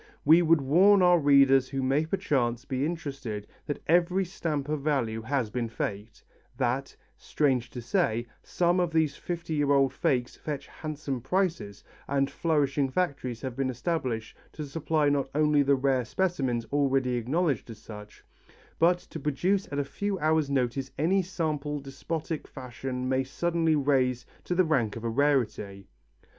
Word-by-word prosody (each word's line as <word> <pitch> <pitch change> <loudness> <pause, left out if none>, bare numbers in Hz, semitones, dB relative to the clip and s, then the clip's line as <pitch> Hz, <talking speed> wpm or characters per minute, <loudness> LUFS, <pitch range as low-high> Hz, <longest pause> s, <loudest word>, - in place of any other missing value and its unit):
We 160 +4 +7
would 165 -2 +4
warn 185 +8 +5
our 180 -1 +6
readers 140 -2 +5
who 135 -1 -2
may 140 +4 +1
perchance 135 -9 0
be 135 +1 -1
interested, 135 -10 -5 0.2
that 145 - -4
every 180 +3 +3
stamp 155 -6 -3
of 150 -1 -2
value 125 -7 0
has 120 -2 -1
been 120 -1 -2
faked, 110 -2 -5 0.3
that, 130 +2 -1 0.2
strange 130 -5 0
to 120 -1 -8
say, 120 - 0 0.2
some 175 +1 +1
of 175 -2 +1
these 155 -3 +2
fifty 170 -1 -5
year 145 -2 +1
old 135 -2 +3
fakes 125 -3 0
fetch 150 -3 -5
handsome 145 -4 -5
prices 165 - -1 0.2
and 135 0 0
flourishing 145 -4 +1
factories 135 -7 -2
have 130 -3 -5
been 135 0 -1
established 125 -4 -3 0.2
to 155 - -5
supply 155 +1 0
not 140 -2 +1
only 150 -1 +4
the 140 0 +3
rare 130 -1 +1
specimens 130 -6 -1
already 135 -3 +2
acknowledged 130 +2 0
as 115 - -8
such, 105 -1 -12 0.6
but 175 +2 +4
to - - -10
produce 180 +7 0
at 140 - -3
a 145 - 0
few 200 +7 -3
hours' 155 -3 +1
notice 135 0 -1
any 185 +6 +2
sample 155 -5 -3
despotic 150 +3 -5
fashion 130 -1 -5
may 130 0 +1
suddenly 165 +3 0
raise 130 -4 +1 0.2
to 180 - -1
the 185 0 +4
rank 125 -10 +1
of 115 - -7
a 115 - -1
rarity. 110 -7 0
140 Hz, 160 wpm, -28 LUFS, 125-160 Hz, 0.6 s, We